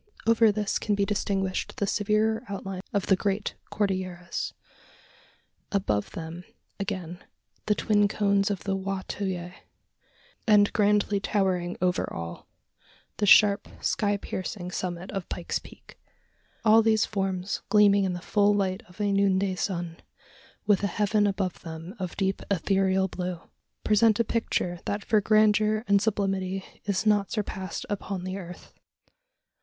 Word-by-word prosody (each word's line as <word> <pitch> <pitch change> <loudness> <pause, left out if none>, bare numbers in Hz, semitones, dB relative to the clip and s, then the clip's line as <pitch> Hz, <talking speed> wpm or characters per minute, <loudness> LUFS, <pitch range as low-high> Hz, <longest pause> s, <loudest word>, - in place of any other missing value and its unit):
Over 225 -1 +5
this 210 -1 -1
can 210 - 0
be 200 0 +1
distinguished 195 -2 -1
the 200 - 0
severer 215 +3 +1
outlines 195 -1 -5
of 200 -2 0
the 190 - +4
great 200 +1 -1 0.2
Cordilleras; 185 -4 -2 1.2
above 190 - 0
them, 165 +2 -7 0.4
again, 185 -3 -4 0.4
the 210 - +3
twin 205 -1 +3
cones 200 -1 +1
of 200 -3 -3
the 195 -1 -1
Wa 195 0 -3
to 205 - -3
yah; 175 -2 -3 1.0
and 205 -2 +5
grandly 205 -1 +2
towering 185 -3 0
over 180 0 0
all, 85 0 -7 0.7
the 205 - +1
sharp 200 0 +6
sky 205 -1 0
piercing 185 -1 -5
summit 180 0 -4
of 195 -3 -5
Pike's 175 - -3
Peak. - - -16 0.7
All 220 +1 +7
these 220 -1 +3
forms 190 -2 -2
gleaming 205 -1 +5
in 185 -2 0
the 175 - -5
full 205 +1 +3
light 190 -2 0
of 180 - -18
a 205 -1 +1
noonday 195 -1 +2
sun, 175 -3 -3 0.7
with 205 -3 +3
a - - +3
heaven 205 +2 +1
above 190 -2 -2
them 165 +2 -8
of 185 -2 -5
deep 195 -1 0
ethereal 190 0 +2
blue, 180 -1 -4 0.4
present 215 0 +4
a - - +5
picture 180 -6 -1
that 205 0 -3
for 215 -3 +3
grandeur 215 +1 +3
and 200 -1 +4
sublimity 195 -3 -1 0.2
is 200 +1 0
not 205 -2 +3
surpassed 190 -3 -4
upon 195 -2 -4
the 185 +1 -4
earth. 180 -2 -9
195 Hz, 145 wpm, -27 LUFS, 185-210 Hz, 1.2 s, All